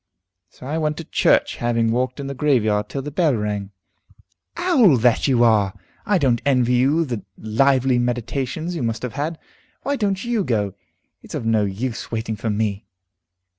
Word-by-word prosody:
So - - -14
I 155 +4 -2
went 150 -1 -1
to 165 - -5
church, - - +2
having 115 -1 +1
walked 125 +3 -1
in 140 - -4
the 140 - -4
graveyard 115 -7 +1
till 135 - -4
the 150 - -6
bell 155 -3 +2
rang." 105 -2 -3 0.9
"Owl 270 - +4
that 120 +3 +3
you 125 -3 +3
are! 105 -4 +3 0.3
I 205 - +3
don't 130 -7 +2
envy 125 -3 +2
you 140 +7 +3
the 120 -6 -4
lively 130 +3 +2
meditations 125 +7 -2
you 165 - -3
must 115 0 -2
have 125 - -4
had. 155 +4 -3 0.5
Why 285 - 0
don't 200 -2 -1
you 235 -4 0
go? 105 - -1 0.5
It's - - -9
of - - -4
no 110 -2 +2
use 110 +5 -4
waiting 110 -1 -2
for 110 +2 -3
me." 105 -1 -2
125 Hz, 175 wpm, -21 LUFS, 110-150 Hz, 0.9 s, Owl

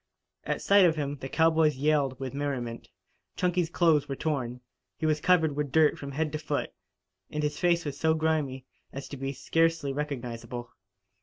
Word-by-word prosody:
At - - -2
sight 200 -1 +6
of 165 -2 +3
him 145 -2 -3
the 135 - -7
cowboys 160 -1 +3
yelled 140 -2 +1
with 135 -1 -5
merriment. 130 -5 -4 0.5
Chunky's 180 -2 +1
clothes 155 -5 +3
were 135 - -2
torn. 130 -5 -2 0.4
He 160 - -3
was 155 -1 +1
covered 160 -5 +3
with 145 -2 -2
dirt 155 0 +4
from 140 -1 -7
head 155 +1 -1
to 155 - -3
foot, 150 -1 -3 0.6
and 150 0 -3
his 150 0 -2
face 175 -1 +2
was 145 -1 -5
so 160 0 +3
grimy 155 -5 -1 0.3
as 135 0 -7
to - - -6
be 135 +1 -3
scarcely 165 +1 +1
recognizable. 125 -4 -5
150 Hz, 175 wpm, -28 LUFS, 135-160 Hz, 0.6 s, sight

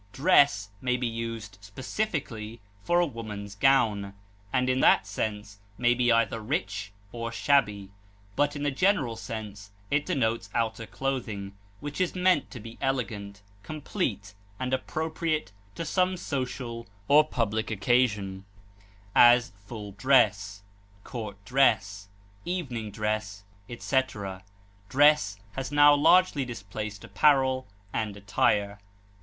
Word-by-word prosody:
Dress 140 - +4
may 125 -1 +1
be 125 - -2
used, 115 -3 -5
specifically, 115 - -4 0.2
for 175 0 +2
a 175 - +4
woman's 105 -7 -7
gown, 105 -4 +2 0.4
and 125 -1 +1
in 130 0 +1
that 100 - +5
sense 105 0 -4 0.2
may 120 +2 +3
be 120 0 +2
either 115 0 +2
rich 100 -5 -3 0.2
or 115 -1 -4
shabby; 105 -7 +1 0.4
but 145 0 +1
in 145 - -4
the 145 - +1
general 140 - +1
sense 105 -3 -7 0.2
it 145 +1 +1
denotes 115 -4 0
outer 115 -1 -1
clothing 110 -8 -4 0.3
which 145 +4 -4
is 185 - 0
meant 180 -5 +2
to 125 - -9
be 115 +1 -11
elegant, 105 -6 -3 0.2
complete, 135 - -4 0.3
and 130 0 -2
appropriate 155 +2 -2 0.2
to 165 - -4
some 185 +3 +1
social 125 -6 -4 0.2
or 150 +2 +7
public 110 -6 -2
occasion; 105 -3 +1 0.7
as, 120 0 +6 0.2
full 105 -3 -7
dress, 100 -3 +2 0.4
court 110 -5 -6
dress, 105 -5 +2 0.4
evening 135 - -3
dress, 105 -1 -3 0.3
etc. 110 -7 -2 0.5
Dress 140 -8 +4
has 135 +3 -5
now 145 0 +7
largely 150 0 +4
displaced 110 -3 -6
apparel 130 -3 +2 0.3
and 105 -3 -2
attire. 100 0 +1
115 Hz, 120 wpm, -27 LUFS, 105-135 Hz, 0.7 s, or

